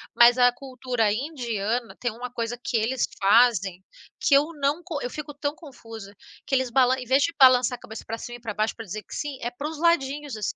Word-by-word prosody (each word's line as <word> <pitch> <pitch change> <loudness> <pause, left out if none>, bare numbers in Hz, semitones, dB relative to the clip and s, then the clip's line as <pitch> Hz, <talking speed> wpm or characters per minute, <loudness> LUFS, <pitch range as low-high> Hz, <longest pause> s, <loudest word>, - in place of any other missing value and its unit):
Mas 240 +1 +7
a 245 0 +5
cultura 250 -4 -2
indiana 235 -3 -3
tem 240 -2 -1
uma 245 +2 -7
coisa 235 0 -4
que 235 - 0
eles 240 +4 0
fazem 200 -3 +3 0.4
que 280 - +2
eu 285 +2 +5
não 285 +5 0
co 315 -6 -5
eu 245 - -3
fico 295 +1 -7
tão 290 +1 -3
confusa. 225 - -11 0.3
Que 270 - +1
eles 260 -1 +1
balan 260 0 +4
em 250 - -7
vez 265 +3 +3
de 335 - 0
balançar 255 -1 +6
a - - -31
cabeça 220 - -9
pra 225 +1 -4
cima 240 +1 -8
e - - -23
pra 220 -3 -5
baixo 215 +1 -1
pra 225 - -8
dizer 210 +3 -6
que - - -13
sim, 290 -3 -4
é 240 - -3
pros 295 +5 -6
ladinhos, 290 -5 0
assim. 210 - -3
245 Hz, 225 wpm, -25 LUFS, 225-275 Hz, 0.4 s, Mas